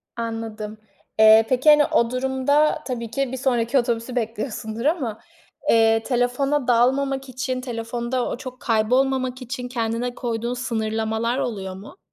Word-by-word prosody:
Anladım. 225 -2 -5 0.4
Eee, 220 0 +8
peki, 260 +4 +3
hani, 295 -1 +7
o 235 -3 +1
durumda 265 +4 +1
tabii 235 -3 -4
ki 275 +1 -1
bir 260 - -4
sonraki 245 -1 +1
otobüsü 235 0 -2
bekliyosundur 225 0 -3
ama, 275 -9 0 0.5
eee, 225 0 +4
telefona 250 +3 0
dalmamak 265 +3 +2
için 255 0 -3
telefonda 240 0 -3
o - - -4
çok 255 -1 -9
kaybolmamak 255 +3 +1
için 250 0 -5
kendine 240 0 -2
koyduğun 235 0 -3
sınırlamalar 225 -1 -1
oluyor 200 -8 -3
mu? 200 - -12
245 Hz, 135 wpm, -23 LUFS, 225-260 Hz, 0.5 s, Eee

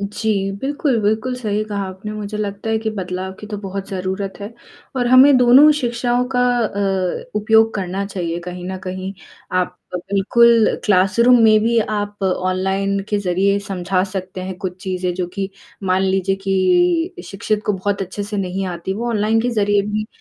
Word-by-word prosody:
जी, 200 -1 -1
बिल्कुल, 280 -3 0
बिल्कुल, 220 +5 0
सही 215 -4 -1
कहा 205 -2 -3
आपने। 190 +3 -7
मुझे 210 0 -5
लगता 205 +1 -3
है 220 - +1
कि 220 0 -2
बदलाव 185 -2 -4
की 210 - -8
तो 210 0 -5
बहुत 195 -1 -6
ज़रूरत 190 +1 -4
है, 205 +3 -7 0.4
और 245 -1 +1
हमें 260 +3 +7
दोनों 250 +4 +7
ही 305 - +7
शिक्षाओं 240 0 0
का 250 - +3 0.2
अ, 195 -4 -1
उपयोग 220 +1 +4
करना 195 0 -2
चाहिए 175 -4 -3
कहीं 180 0 -7
न 190 0 -4
कहीं। 185 +1 -5 0.4
आप 180 0 -1 0.2
बिल्कुल 215 +5 +3 0.2
क्लासरूम 210 +6 +4
में 215 -1 +6
भी 230 +1 +2
आप 205 -2 -2
ऑनलाइन 190 +1 0
के 205 - 0
ज़रिए 195 +2 +1
समझा 185 -2 -1
सकते 185 -1 -5
हैं 185 0 -5
कुछ 185 -3 -4
चीज़ें 185 -1 -2
जो 180 0 -2
कि 195 -1 -2 0.4
मान 185 0 +2
लीजिए 195 0 +1
कि 330 - +2
शिक्षित 205 +3 -2
को 210 - +2
बहुत 200 +1 -2
अच्छे 190 +2 -5
से 205 +1 -5
नहीं 195 0 -2
आती, 175 +1 -4
वो 235 +4 -3
ऑनलाइन 220 0 +1
के 245 +2 0
ज़रिए 205 -3 +2
भी 215 +1 -2
200 Hz, 180 wpm, -19 LUFS, 190-220 Hz, 0.4 s, हमें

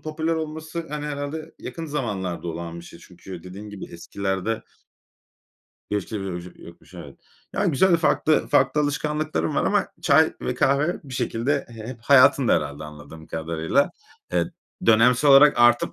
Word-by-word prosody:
popüler 160 +1 -2
olması 160 +1 -5
hani 150 0 -4
herhâlde 150 +2 -5
yakın 165 -1 -7
zamanlarda 100 - -3
olan 85 +1 -6
bir 85 - -13
şey. 85 - -13
Çünkü 90 -1 -11
dediğin 100 +3 -9
gibi 100 -2 -8
eskilerde 95 +4 -3 1.3
geçmişte, 105 0 -3
böyle, 95 -2 -4
bir 90 +1 -8
şey - - -15
yokmuş, - - -15
evet. - - -11 0.3
Ya, - - 0
güzel, 175 +2 +4
farklı, 155 -1 +2
farklı 135 +3 +3
alışkanlıkların 150 - -1
var - - +1
ama - - +1
çay - - +4
ve - - -2
kahve 140 +6 +1
bir 135 -2 -8
şekilde 135 +4 -1
he 120 - -13
hep 120 -3 -8
hayatında 130 -1 +5
herhâlde 70 +2 -3
anladığım 75 +1 -11
kadarıyla. 80 0 0 0.4
Eee, 85 -1 +2 0.4
dönemsel 125 +5 +5
olarak 140 +2 +7
artıp 120 0 +4
125 Hz, 155 wpm, -24 LUFS, 90-150 Hz, 1.3 s, olarak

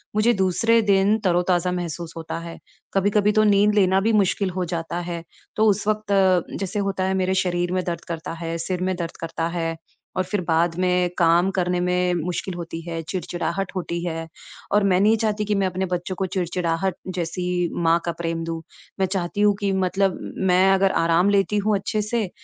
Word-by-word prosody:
मुझे 220 +3 +4
दूसरे 225 +4 +2
दिन 200 +1 +3
तरोताज़ा 180 -1 +2
महसूस 170 -2 -4
होता 165 0 -5
है। 170 0 -8 0.4
कभी-कभी 205 +1 +3
तो 215 0 +3
नींद 205 0 +4
लेना 190 -2 +4
भी 225 +3 +1
मुश्किल 200 -1 +2
हो 180 0 -2
जाता 170 0 -3
है, 170 -1 -5 0.3
तो 215 - +3
उस 205 -1 +2
वक़्त 215 -1 0 0.5
जैसे 195 +2 -3
होता 195 -1 -1
है 190 0 +1
मेरे 185 +1 +1
शरीर 175 -1 -1
में 185 0 0
दर्द 170 -1 -3
करता 165 -1 -5
है, 165 0 -4
सिर 180 +2 -3
में 185 0 0
दर्द 170 -1 -5
करता 165 0 -2
है, 165 -1 -1 0.4
और 185 - +2
फिर 190 +2 -2
बाद 165 0 +2
में 180 -1 +2
काम 170 +1 +4
करने 180 -1 0
में 180 0 +1
मुश्किल 175 +2 -3
होती 165 -1 -6
है, 165 -1 -3
चिड़चिड़ाहट 175 +2 -3
होती 170 -2 -3
है। 165 -2 -4 0.4
और 205 0 +3
मैं 185 -2 +3
नहीं 215 +3 +5
चाहती 215 -1 -1
कि 210 0 0
मैं 195 -1 +2
अपने 185 +1 -2
बच्चों 180 +2 -3
को 190 - -1
चिड़चिड़ाहट 180 0 -1 0.2
जैसी 180 0 -1
माँ 165 +1 +4
का 170 - 0
प्रेम 165 -1 -2
दूँ। 165 0 -4 0.4
मैं 190 - +3
चाहती 190 +1 -2
हूँ 205 -1 +4
कि 200 -2 0
मतलब 190 0 +1 0.3
मैं 185 +2 +5
अगर 195 0 +3
आराम 170 +3 +3
लेती 200 +1 +2
हूँ 210 +1 +2
अच्छे 210 +2 -2
से, 215 -1 -1
185 Hz, 195 wpm, -23 LUFS, 170-195 Hz, 0.5 s, नहीं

